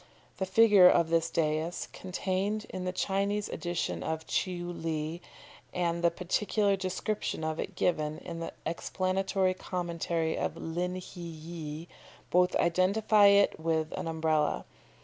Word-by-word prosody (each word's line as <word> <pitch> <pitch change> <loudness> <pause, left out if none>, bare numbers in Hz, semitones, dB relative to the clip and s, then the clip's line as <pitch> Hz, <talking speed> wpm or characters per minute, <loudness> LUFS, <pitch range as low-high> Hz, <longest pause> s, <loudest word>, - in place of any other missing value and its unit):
"The 190 - -2
figure 200 -2 +7
of 165 -1 +3
this 165 0 +2
dais 160 +1 -1
contained 190 +3 -2
in 185 0 -4
the 180 - 0
Chinese 200 +2 -1
edition 175 -2 -2
of 160 0 -3
Tcheou 175 -2 -2
Li, 160 +1 -2 0.5
and 170 -1 0
the 170 - +6
particular 200 +4 +1
description 190 -1 -3
of 155 0 -2
it - - -4
given 155 -3 0
in 170 -2 -7
the 165 - -4
explanatory 185 +3 0
commentary 170 -3 -2
of 165 - -2
Lin 175 +3 -3
hi 185 -1 -8
ye, 160 -1 -7 0.4
both 180 +1 +3
identify 200 +4 +4
it 200 -3 +4
with 160 -1 0
an - - -4
Umbrella. 160 -2 0
175 Hz, 135 wpm, -30 LUFS, 165-190 Hz, 0.5 s, figure